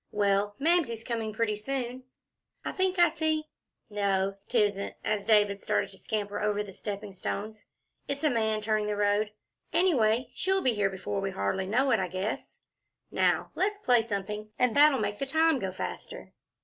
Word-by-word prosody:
Well, 205 0 +1
Mamsie's 285 -8 +1
coming 230 -2 -2
pretty 215 0 0
soon. 255 +2 -4 0.6
I - - -1
think 375 0 0
I 345 0 +7
see 315 -1 -1 0.4
No, 195 -2 0
'tisn't," 205 -4 +1
as 210 -2 0
David 205 -2 +3
started - - 0
to 190 - -13
scamper 205 -2 -3
over 210 0 +1
the 200 -2 -10
stepping 205 0 -6
stones 210 +3 -5 0.4
"it's 280 +2 -4
a 305 - +3
man 220 -2 +1
turning 215 0 0
the 210 - -1
road. 205 +1 +1 0.4
Anyway, 250 -9 +2
she'll 385 +1 0
be 255 - +3
here 205 -2 +1
before 195 +1 -3
we 195 - -1
hardly 190 - -1
know 260 +6 +2
it, 230 - +4
I 185 - 0
guess. 185 +4 -4 0.5
Now - - +1
let's 410 +2 0
play 250 - +4
something, 210 -1 -4
and 250 -2 +2
that'll 290 -1 +7
make 205 -3 -2
the 275 - -2
time 320 0 +3
go 190 -4 -2
faster." 90 - -7
215 Hz, 175 wpm, -29 LUFS, 205-260 Hz, 0.6 s, I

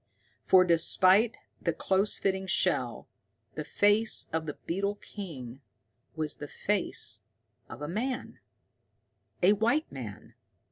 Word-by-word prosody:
For, 185 -1 +6
despite 185 +6 +4 0.2
the 170 - 0
close 195 +5 +1
fitting 190 0 -1
shell, 190 - 0 0.5
the - - -4
face 205 +2 +2
of 160 -1 -1
the 150 - -4
beetle 200 +4 -1
king 140 - -9 0.5
was 155 -2 -3
the 145 - -7
face 130 - -2 0.5
of 120 +5 -8
a - - -3
man 240 - -3 1.0
a 195 +3 +7
white 235 +9 +1
man! 115 -7 -8
185 Hz, 120 wpm, -29 LUFS, 150-205 Hz, 1.0 s, a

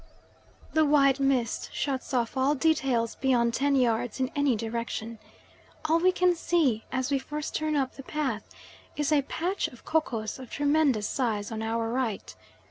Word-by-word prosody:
The 315 - +4
white 280 -2 +4
mist 270 -4 0
shuts 270 -3 -3
off 240 -2 0
all 270 +3 +2
details 265 -6 +1
beyond 240 -3 +2
ten 280 +3 +2
yards 245 -1 +1
in 260 0 0
any 285 -4 +2
direction. 230 0 -4 0.7
All 320 +2 +3
we 370 +2 +4
can 365 -1 +3
see, 320 -10 +1
as 260 +1 -1
we 275 - +2
first 300 +3 -5
turn 310 -1 0
up 270 -2 0
the - - -9
path, 265 -6 -3 0.5
is 295 0 0
a 295 -2 +4
patch 350 +7 -2
of 245 - -15
kokos 235 -9 -1
of 255 -3 -9
tremendous 285 -7 +2
size 225 -5 -1
on 220 0 -4
our 225 +1 -1
right. 235 -3 -2
265 Hz, 165 wpm, -28 LUFS, 230-295 Hz, 0.7 s, The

